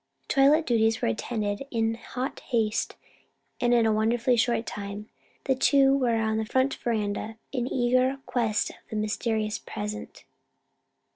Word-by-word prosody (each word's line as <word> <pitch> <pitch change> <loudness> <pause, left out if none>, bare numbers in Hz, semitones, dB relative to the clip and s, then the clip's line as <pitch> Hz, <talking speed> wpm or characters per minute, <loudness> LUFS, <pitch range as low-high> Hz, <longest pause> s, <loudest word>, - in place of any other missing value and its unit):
Toilet 290 +3 +4
duties 225 -2 +2
were - - +1
attended 205 - -2
to 275 - -7
in 225 -2 0
hot 255 +4 -5
haste 225 -4 -1 0.6
and 240 - +2
in 235 -2 +4
a 220 - +3
wonderfully 230 +3 +2
short 235 0 +1
time 205 +1 -6 0.3
the 270 - +2
two 270 +1 +4
were 250 -4 +2
on 220 -1 0
the - - 0
front 260 +4 +1
veranda 220 -1 -2
in 250 -2 -2
eager 255 +2 +2
quest 225 -4 0
of - - -16
the - - -5
mysterious 215 0 -1
present. 105 0 -7
230 Hz, 150 wpm, -27 LUFS, 215-255 Hz, 0.6 s, Toilet